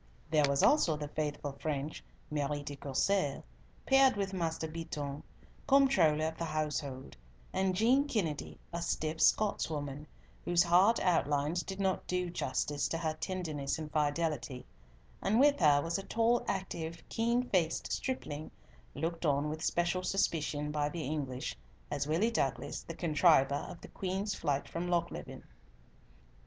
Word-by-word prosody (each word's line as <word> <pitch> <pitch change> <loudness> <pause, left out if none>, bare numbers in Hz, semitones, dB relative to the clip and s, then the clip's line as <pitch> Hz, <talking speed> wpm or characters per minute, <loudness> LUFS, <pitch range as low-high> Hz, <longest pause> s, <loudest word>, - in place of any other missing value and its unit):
There 150 -3 +4
was 140 0 +2
also 170 - +4
the 150 -1 -5
faithful 150 -1 -3
French 150 0 -3 0.3
Marie 145 -1 -1
de 145 0 -6
Courcelles, 145 +3 0 0.4
paired 270 -2 +5
with 195 -1 -2
Master 165 -3 -2
Beatoun, 150 -3 -5 0.5
comptroller 190 - +4
of 160 0 -4
the 170 - -1
household, 150 -4 -3 0.4
and 190 -1 +1
Jean 250 +8 +4
Kennedy, 170 - -2 0.2
a 170 - -2
stiff 160 -1 -2
Scotswoman, 150 -8 +1 0.4
whose 175 0 +4
hard 185 +6 +5
outlines 155 -2 +1
did 190 +1 -7
not 190 -1 0
do 180 -1 -1
justice 145 -1 -1
to 165 - -2
her 160 -2 -1
tenderness 155 -5 -3
and 155 -1 -6
fidelity, 145 -4 -1 0.6
and 215 +4 +2
with 285 +1 +5
her 145 -4 +5
was 170 +3 -1
a - - -6
tall, 230 +3 +2
active, 170 -4 -3
keen 235 +2 +1
faced 170 -4 +1
stripling, 155 - -3 0.5
looked 165 +3 -3
on 145 -1 +2
with 155 +1 -5
special 175 +2 +1
suspicion 155 -6 0
by 150 -1 0
the 165 +1 -4
English, 135 -3 -3 0.4
as 145 -1 -1
Willie 180 +10 +2
Douglas, 135 - -1
the 165 - -8
contriver 150 -4 +3
of 175 -2 -9
the - - -9
Queen's 195 +2 -2
flight 145 -6 -1
from 170 +1 -4
Lochleven. 170 - -2
160 Hz, 145 wpm, -32 LUFS, 145-185 Hz, 0.6 s, paired